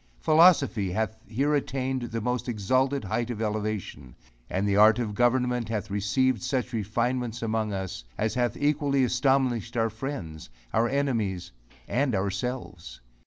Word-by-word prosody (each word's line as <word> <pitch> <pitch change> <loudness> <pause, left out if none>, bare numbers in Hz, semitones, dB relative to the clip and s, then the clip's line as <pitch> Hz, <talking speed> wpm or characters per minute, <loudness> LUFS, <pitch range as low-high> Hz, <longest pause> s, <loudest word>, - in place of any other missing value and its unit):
Philosophy 145 - +4
hath 110 +2 -1
here 140 +6 0
attained 135 -2 -1
the 115 -1 -4
most 125 +2 -2
exalted 130 +5 +1
height 110 +4 -2
of 120 -3 -4
elevation; 105 - -3 0.3
and 95 +2 -1
the 100 - +2
art 110 +2 +6
of 115 -4 -2
government 125 0 +1
hath 105 -2 -3
received 110 +4 +1
such 125 0 -2
refinements 115 +2 -1
among 110 -1 -1
us, 95 -10 -4
as 110 0 0
hath 120 -3 0
equally 145 -2 +1
astonished 125 -2 +1
our 115 -1 +1
friends, 110 - -6 0.2
our 115 +1 +2
enemies 115 -10 -1 0.4
and 130 -2 +1
ourselves. 95 - -4
115 Hz, 140 wpm, -27 LUFS, 105-130 Hz, 0.4 s, art